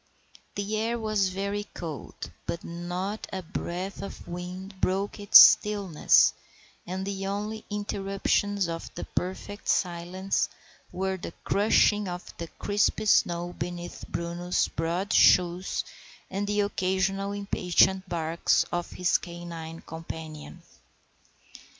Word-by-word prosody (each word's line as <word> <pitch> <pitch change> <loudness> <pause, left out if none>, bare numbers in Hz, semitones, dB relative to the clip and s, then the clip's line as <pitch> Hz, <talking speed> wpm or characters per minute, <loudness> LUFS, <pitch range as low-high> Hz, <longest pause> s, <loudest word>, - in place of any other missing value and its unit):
The 205 +2 -2
air 230 +2 0
was 215 -4 +1
very 200 +2 -3
cold, 160 -5 -7 0.2
but 170 - -3
not 180 +5 -4
a 190 -1 -4
breath 180 +3 -4
of 195 - -8
wind 180 +2 -7
broke 195 +3 0
its 205 -1 +8
stillness, 200 -6 +6 0.5
and 190 +2 -3
the 195 -1 -3
only 210 +2 -3
interruptions 200 -1 0
of 165 0 -5
the - - -5
perfect 190 +3 -5
silence 180 +2 0 0.4
were 190 +1 -2
the 170 - -7
crushing 210 0 +3
of 180 0 -7
the 170 - -4
crisp 205 +5 0
snow 175 -4 +2
beneath 175 -1 -6
Bruno's 170 +1 -1
broad 175 +5 -2
shoes 180 +1 +4 0.5
and 200 +2 -2
the 205 0 +1
occasional 195 0 0
impatient 190 -1 +2
barks 165 -1 +1
of 175 0 -2
his 180 -1 +2
canine 170 -2 -8
companion. 160 -1 -8
190 Hz, 115 wpm, -27 LUFS, 175-200 Hz, 0.5 s, its